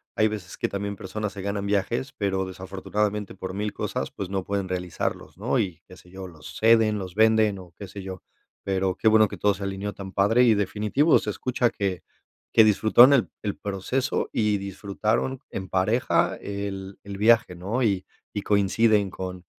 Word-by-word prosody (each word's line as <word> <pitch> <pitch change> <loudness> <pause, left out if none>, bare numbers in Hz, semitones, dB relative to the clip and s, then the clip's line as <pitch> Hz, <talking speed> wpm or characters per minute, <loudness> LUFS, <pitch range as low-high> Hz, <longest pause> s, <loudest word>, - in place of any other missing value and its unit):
hay 110 - +4
veces 105 -4 -6
que - - 0
también 100 0 -3
personas 105 +2 -5
se 100 - -7
ganan 100 0 -2
viajes, 115 +6 -1
pero 95 -5 -1
desafortunadamente 100 +2 -3
por 95 0 -6
mil 105 +1 -3
cosas, - - -3
pues 95 - -6
no 95 -1 -2
pueden 100 -1 -2
realizarlos, 90 -1 -3
¿no? 120 +5 0
Y 90 -7 -2
qué 90 - -13
sé 90 - -18
yo, 95 +1 -8
los 80 -4 -11
ceden, 110 -1 +4
los 95 -3 -6
venden 110 -1 +3
o 90 -2 -13
qué 100 - -8
sé 100 +2 -8
yo. 95 -1 -8 0.4
Pero 95 -1 0
qué 110 - 0
bueno 110 0 +6
que - - -8
todo 105 0 +2
se 100 +1 -7
alineó 100 +1 -3
tan 95 -1 -8
padre 110 +5 +4
y 115 -3 +5
definitivo 105 - +2
se - - -4
escucha 125 +3 0
que 95 -4 -2 0.5
que 110 - +7
disfrutaron 110 +5 +6
el 130 -5 +3
el 105 -2 -2
proceso 105 +8 -2
y 105 -2 +2
disfrutaron 100 +6 -2
en 95 -1 -5
pareja 95 -3 +1
el 100 -1 -5
el 100 -1 -7
viaje, 110 -3 +4
¿no? 100 +9 -2
Y 100 -4 +1 0.3
y 105 - -2
coinciden 100 0 +2
con 90 -1 -6
100 Hz, 185 wpm, -25 LUFS, 95-110 Hz, 0.5 s, que